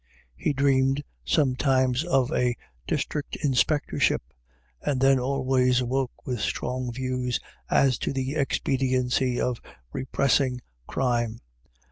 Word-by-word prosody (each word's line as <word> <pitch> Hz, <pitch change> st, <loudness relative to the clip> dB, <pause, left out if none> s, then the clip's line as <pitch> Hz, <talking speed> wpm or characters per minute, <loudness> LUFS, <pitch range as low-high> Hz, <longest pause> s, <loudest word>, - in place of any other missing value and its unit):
He 150 Hz, -, 0 dB
dreamed 135 Hz, 0 st, +2 dB, 0.2 s
sometimes 130 Hz, -, +2 dB
of 135 Hz, 0 st, +1 dB
a 125 Hz, -1 st, +1 dB, 0.3 s
District 150 Hz, -2 st, -2 dB
Inspectorship, 145 Hz, +2 st, +2 dB, 0.6 s
and 140 Hz, -3 st, 0 dB
then 135 Hz, 0 st, +5 dB
always 130 Hz, -1 st, +2 dB
awoke 130 Hz, +1 st, -2 dB
with 125 Hz, -3 st, -2 dB
strong 125 Hz, +4 st, -2 dB
views 125 Hz, 0 st, -2 dB, 0.3 s
as 135 Hz, -3 st, +3 dB
to -, -, -1 dB
the 135 Hz, 0 st, -2 dB
expediency 130 Hz, -3 st, +1 dB
of 125 Hz, -2 st, -1 dB, 0.3 s
repressing 130 Hz, -1 st, +1 dB, 0.3 s
crime. 120 Hz, -3 st, 0 dB
130 Hz, 105 wpm, -26 LUFS, 125-135 Hz, 0.6 s, then